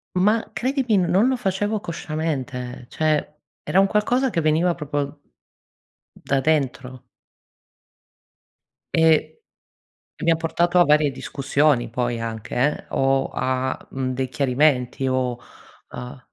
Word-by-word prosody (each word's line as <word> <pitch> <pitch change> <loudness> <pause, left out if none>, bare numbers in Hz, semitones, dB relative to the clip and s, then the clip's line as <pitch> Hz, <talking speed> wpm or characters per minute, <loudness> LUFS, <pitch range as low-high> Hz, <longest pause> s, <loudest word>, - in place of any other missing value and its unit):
ma 210 +5 +2
credimi, 255 -3 +1
non 195 +7 +4
lo 260 - +2
facevo 205 -1 -1
consciamente 145 -8 -4
cioè 155 -1 0 0.4
era 190 - +3
un 195 - +6
qualcosa 245 +6 +1
che 165 - 0
veniva 160 +3 +2
proprio 145 -1 -3 1.1
da 135 -1 +1
dentro. 130 -3 -1 1.9
E 160 -1 +4 0.9
e - - -5
mi 170 - +4
ha 165 - +4
portato 170 +2 +1
a - - +7
varie 150 -1 +4
discussioni 140 -1 0
poi 120 0 -2
anche 110 -1 -5
eh, 140 +5 0
o, 135 0 +1
a, 130 0 -1
mhmm, 130 -1 -2
dei 130 0 -2
chiarimenti 135 -1 +1
o, 125 -2 -1 0.5
a 125 +1 -8
150 Hz, 120 wpm, -22 LUFS, 130-175 Hz, 1.9 s, a